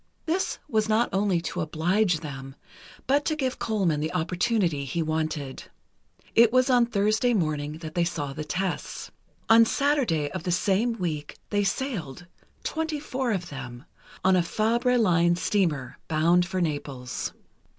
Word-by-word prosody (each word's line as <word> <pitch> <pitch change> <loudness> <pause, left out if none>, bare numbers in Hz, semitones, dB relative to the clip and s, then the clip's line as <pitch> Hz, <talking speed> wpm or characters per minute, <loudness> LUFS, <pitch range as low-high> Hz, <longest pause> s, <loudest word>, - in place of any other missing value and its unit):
This 345 +4 0
was 220 -1 +1
not 225 +3 +3
only 195 -2 +2
to 180 +1 -3
oblige 170 +3 +1
them, 135 -3 -7 0.5
but 285 +3 +2
to 310 - +1
give 260 -4 -2
Colman 190 -9 0
the 155 +2 -2
opportunity 180 -2 0
he 160 +5 -2
wanted. 155 -3 -3 0.7
It 230 -1 +6
was 255 +1 +3
on 245 -2 +4
Thursday 220 +3 +2
morning 150 -5 -1
that 155 0 -8
they 175 - +2
saw 155 -5 -3
the 155 - -5
tests. 185 +4 -3 0.4
On 225 +1 +8
Saturday 230 - +1
of - - -4
the 180 - -2
same 200 +6 +2
week 160 -8 -4
they 205 -1 +2
sailed—twenty 235 - -4
four 260 -4 -2
of 180 -4 -2
them—on 135 +7 -3
a 180 - +4
Fabre 235 +7 +1
Line 175 -6 +3
steamer, 170 -8 -1
bound 170 +3 +3
for 185 0 -2
Naples. 140 -5 -3
180 Hz, 145 wpm, -26 LUFS, 155-225 Hz, 0.7 s, On